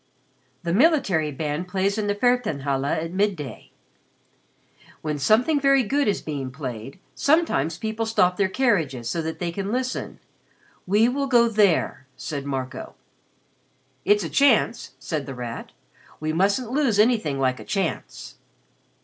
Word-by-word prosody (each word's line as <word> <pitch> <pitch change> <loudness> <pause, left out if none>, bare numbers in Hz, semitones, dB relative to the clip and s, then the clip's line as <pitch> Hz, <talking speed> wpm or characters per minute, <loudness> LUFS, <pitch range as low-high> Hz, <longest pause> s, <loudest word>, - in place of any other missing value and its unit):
"The 170 -1 -1
military 205 - +3
band 150 +4 -3
plays 195 +2 0
in 215 -1 -2
the 205 - 0
Feldherrn 245 - +1
halle 135 -1 -1
at 160 +3 -1
midday. 185 - -2 1.3
When 150 -2 -2
something 245 - +3
very 275 -1 +4
good 280 +6 0
is 205 - 0
being 140 -4 -4
played, 130 - -7 0.2
sometimes 280 - +1
people 220 +3 -3
stop 180 -5 +3
their 190 0 +1
carriages 165 - 0
so 165 +8 -1
that 160 0 -4
they 175 -1 -3
can 195 +3 -4
listen. 255 +1 -3 0.7
We 210 +5 +4
will 275 +3 -1
go 240 -3 +5
there," 205 - +1
said 140 +2 -5
Marco. 130 -2 -5 1.1
"It's 205 0 +3
a 165 - -4
chance," 240 -4 +2
said 150 -4 -4
The 135 - -6
Rat. 120 -2 -6 0.5
"We 155 0 -2
mustn't 200 +8 +1
lose 265 -6 +1
anything 210 - +2
like 130 -1 +1
a - - -8
chance." 195 -5 -4
190 Hz, 145 wpm, -24 LUFS, 145-230 Hz, 1.3 s, go